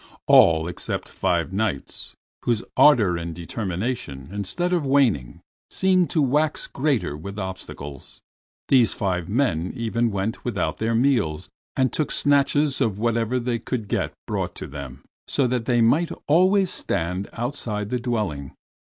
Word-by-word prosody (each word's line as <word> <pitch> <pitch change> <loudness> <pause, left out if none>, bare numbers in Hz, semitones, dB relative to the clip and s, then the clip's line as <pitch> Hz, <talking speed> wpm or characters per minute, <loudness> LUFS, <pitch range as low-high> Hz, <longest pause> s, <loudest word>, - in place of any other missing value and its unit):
All 80 0 +6
except 90 - -3
five 90 -1 -1
Knights, 100 -8 -3 0.3
whose 115 -2 0
ardor 110 -12 +5
and 85 -1 -5
determination, 90 - -4
instead 105 - -1
of 175 -3 +1
waning, 130 - +1 0.3
seemed 185 -2 +2
to 155 - +2
wax 150 +3 +1
greater 135 - -1
with 100 +7 -8
obstacles. 85 -8 -7 0.5
These 125 -5 +4
five 90 -3 -2
men 95 - 0
even 115 -1 0
went 100 +3 -3
without 120 - -1
their 115 +1 0
meals, 115 - +1 0.2
and 130 -1 +1
took 155 - -1
snatches 145 0 +2
of 110 -6 +1
whatever 115 +2 0
they 120 -1 -1
could 115 -1 -4
get - - -1
brought - - -3
to - - -6
them, 70 -2 -8 0.2
so 140 - +1
that 125 -2 -1
they 120 -1 +2
might 150 +9 +3 0.2
always 185 +4 +4
stand 90 +4 -2
outside 115 -4 -2
the 125 - 0
dwelling. 105 - -3
115 Hz, 145 wpm, -24 LUFS, 90-135 Hz, 0.5 s, All